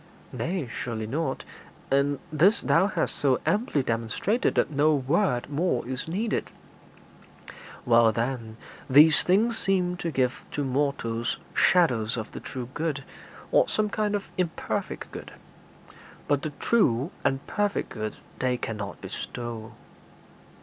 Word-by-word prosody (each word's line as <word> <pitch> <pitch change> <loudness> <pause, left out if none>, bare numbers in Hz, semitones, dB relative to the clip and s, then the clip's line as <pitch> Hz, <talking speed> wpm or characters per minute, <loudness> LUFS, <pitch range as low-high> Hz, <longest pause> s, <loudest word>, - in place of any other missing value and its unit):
'Nay, 170 -5 -2
surely 115 -1 -4
not; 135 +4 -2 0.5
and 140 +1 +2 0.2
this 180 +8 +5
thou 180 +4 +3
hast 205 - -1
so 135 -3 +2
amply 165 - +1
demonstrated 115 - 0
that - - +2
no 150 +2 +3
word 140 -1 +1
more 145 -5 0
is 130 +2 -4
needed.' 210 +7 -1 1.4
'Well, 115 -1 +6
then, 115 -1 -3 0.3
these 150 +3 +7
things 220 +5 +2
seem 180 -2 +1
to 175 - -2
give 130 -4 0
to 145 - -1
mortals 130 -4 -1 0.2
shadows 125 -11 +3
of 110 -1 -5
the - - -7
true 125 -2 -6
good, 150 -3 -2 0.5
or - - +4
some 215 -1 +1
kind 210 -1 0
of 200 - -2
imperfect 175 -3 -2
good; - - -8 0.9
but 145 -1 +2
the 155 - -3
true 145 - +1
and 135 +1 0
perfect 205 -1 -1
good 110 -2 -4 0.2
they 125 -1 +1
cannot 105 -4 -5
bestow.' 115 -2 -6
140 Hz, 130 wpm, -27 LUFS, 120-180 Hz, 1.4 s, these